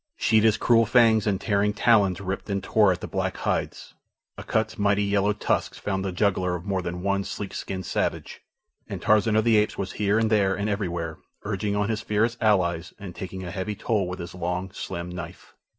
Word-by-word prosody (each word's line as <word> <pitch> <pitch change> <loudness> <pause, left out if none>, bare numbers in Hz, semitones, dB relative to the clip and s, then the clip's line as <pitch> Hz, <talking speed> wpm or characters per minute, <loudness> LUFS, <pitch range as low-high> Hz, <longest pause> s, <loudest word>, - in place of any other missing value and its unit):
Sheeta's 110 - +3
cruel 115 -2 +4
fangs 110 -4 +4
and 100 -2 +1
tearing 105 -1 +1
talons 105 -4 +3
ripped 100 +2 -5
and 100 -1 -2
tore 105 -3 +4
at 90 - -3
the - - -5
black - - -2
hides. - - -3 0.4
Akut's 110 -1 -2
mighty 100 0 +2
yellow 100 0 +2
tusks 105 - -1
found 95 -1 -2
the 95 - -2
jugular 90 -1 +1
of 90 +1 -7
more 95 -2 -1
than 90 0 -5
one 100 0 +1
sleek 100 0 -6
skinned 95 -1 -5
savage, - - -2 0.5
and - - -4
Tarzan 110 +1 +3
of 110 - +3
the 115 -2 +4
Apes 105 0 +1
was 95 -1 -3
here 105 +1 +3
and 110 -1 +1
there 100 -3 +3
and 100 +2 -2
everywhere, 85 -6 -3 0.2
urging 100 0 -2
on 105 +1 0
his 110 -1 -1
fierce 115 +2 0
allies 90 -5 +1
and 95 -3 -9
taking 95 0 -6
a 90 - -6
heavy 100 +3 -3
toll 105 -2 0
with 90 +1 -5
his 85 -1 -7
long, 90 +1 -3
slim 85 -2 -5
knife. 90 -1 -9
100 Hz, 200 wpm, -25 LUFS, 95-105 Hz, 0.5 s, cruel